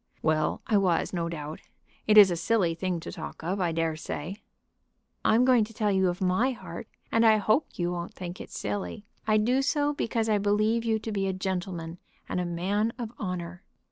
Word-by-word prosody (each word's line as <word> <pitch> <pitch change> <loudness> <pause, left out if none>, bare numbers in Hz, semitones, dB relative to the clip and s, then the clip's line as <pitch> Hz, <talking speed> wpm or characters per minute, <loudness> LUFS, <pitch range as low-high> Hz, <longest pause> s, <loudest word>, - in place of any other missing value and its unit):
"Well 155 -1 +1
I 215 - +3
was, 185 -4 +1
no 170 -2 -1
doubt. 155 -2 -6 0.5
It 215 0 +5
is 200 -3 +10
a - - +1
silly 180 -1 +1
thing 180 +1 -2
to - - -7
talk 160 -1 -8
of, 185 +4 -1
I 175 -2 +1
dare 165 -1 0
say." 160 +4 -5 0.9
"I'm 235 +3 +4
going 250 -3 +5
to 225 0 -15
tell 210 -2 +1
you 190 -1 +3
of 175 +1 -3
my 190 +8 +2
heart, - - -8 0.2
and 230 - +3
I 220 -1 +6
hope 215 +8 +2
you 175 0 0
won't 175 -1 -5
think 180 0 -6
it - - -9
silly. 205 +1 -4 0.2
I 215 0 +4
do 245 +5 +2
so 290 +1 +1
because 230 -5 -1
I 210 -2 +2
believe 215 +3 +2
you 225 -1 +1
to 220 +1 -5
be 195 -2 0
a 190 - 0
gentleman, 180 -3 -4 0.3
and - - -2
a 180 - -1
man 195 +6 0
of 235 -3 -5
honor." 180 -3 -4
195 Hz, 205 wpm, -28 LUFS, 175-220 Hz, 0.9 s, is